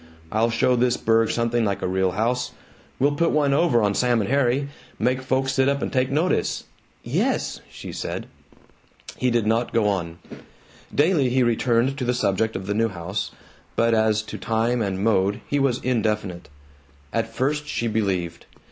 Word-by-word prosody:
I'll 110 +2 +2
show 120 +2 +2
this 125 0 +2
burg 115 0 +2
something 115 0 +1
like 100 -2 -1
a - - 0
real 95 0 +1
house! 125 +4 -1 0.4
We'll 140 +3 +3
put 165 +3 +2
one 145 -2 +2
over 140 -7 +3
on 100 -1 +2
Sam 120 +1 +2
and 105 +3 -2
Harry! 140 0 +2 0.3
Make 130 +1 +1
folks 130 +1 0
sit 135 0 +3
up 140 0 0
an' - - -2
take 130 0 +1
notice!" 155 +6 0 0.4
"Yes," - - -1
she - - -9
said. - - -4 0.9
He 130 - +1
did 120 -3 +1
not 115 +2 +1
go 110 -3 +3
on. 85 -4 -2 0.7
Daily 145 -3 +3
he 130 +1 +2
returned 120 +3 +1
to - - -2
the 125 0 0
subject 110 -1 0
of 95 - -4
the 100 - -1
new 115 +2 +1
house, 95 +1 -4 0.5
but 115 0 +3
as 110 -1 +2
to - - -8
time 115 +2 0
and 95 -2 -2
mode 100 -2 +2
he 145 - 0
was 135 -3 +2
indefinite. 105 -8 -1 0.6
At 115 0 -1
first 150 +5 -1
she 120 -5 -2
believed. 95 -6 -2
115 Hz, 175 wpm, -23 LUFS, 105-130 Hz, 0.9 s, We'll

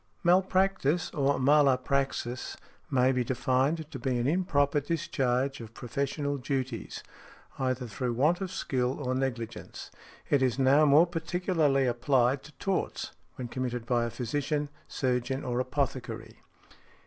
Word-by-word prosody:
Malpractice, 185 -2 +2
or 140 -1 +1
mala 140 0 +5
praxis, 130 -2 -2 0.3
may 130 0 +3
be 125 -1 +1
defined 130 +6 0
to 135 - -6
be 125 +1 0
an 120 - 0
improper 145 -3 +2
discharge 135 -4 -1
of 115 0 -10
professional 140 +3 -2
duties, 130 -3 -3 0.6
either 130 -1 -1
through 120 +2 -3
want 150 +10 +2
of 190 - -2
skill 130 -7 -1
or 130 -3 -1
negligence. 120 -4 -4 0.4
It 145 - +3
is 130 -3 +2
now 135 +3 +5
more 150 +4 +7
particularly 165 -4 +1
applied 125 +2 +2
to 150 - -12
torts—when 180 -9 -4
committed 125 -2 -3
by 120 -1 +1
a - - -2
physician, 145 +5 -2 0.2
surgeon, 130 +1 -1
or 125 0 -1
apothecary. 125 -4 -3
135 Hz, 130 wpm, -29 LUFS, 125-145 Hz, 0.6 s, more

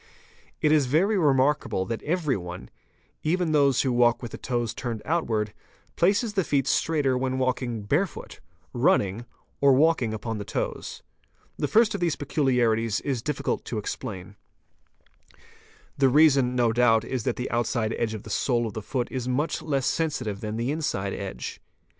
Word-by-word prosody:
It 150 - +4
is 150 -4 +4
very 180 +11 +2
remarkable 140 - +2
that 115 +1 -4
everyone, 135 - -2 0.5
even 170 +1 0
those 140 -4 +3
who 130 -2 0
walk 120 0 +3
with 120 - -6
the - - -7
toes 120 -3 -2
turned 115 -4 -5
outwards, 115 -10 0 0.4
places 205 +5 +2
the 195 -3 +1
feet 140 -4 +1
straighter 145 -4 +1
when 130 0 -1
walking 125 -4 -1
barefoot, 150 - -2 0.3
running, 105 +5 +1 0.3
or 140 -1 +5
walking 140 -4 +3
upon 110 0 -4
the - - -4
toes. - - -4 0.5
The - - -1
first 225 0 +4
of 200 - -4
these 170 -3 +1
peculiarities 120 -7 +1
is 130 -5 -2
difficult 150 +3 -2
to 115 - -4
explain: 105 -2 -6 1.6
The 135 -1 +5
reason 135 -3 +4
no 120 -2 +2
doubt 115 -2 +3
is 130 -1 -2
that 125 - 0
the 125 - -4
outside 115 -1 0
edge 110 -2 -2
of 105 - -8
the - - -9
sole 120 -3 +1
of 110 - -5
the 110 - -5
foot 125 +3 -2
is 125 -2 -3
much 140 +6 -1
less 140 -4 -1
sensitive 130 -10 -1
than 110 0 -4
the 120 +4 -1
inside 100 -11 -2
edge. 95 -11 -6
130 Hz, 165 wpm, -26 LUFS, 115-150 Hz, 1.6 s, or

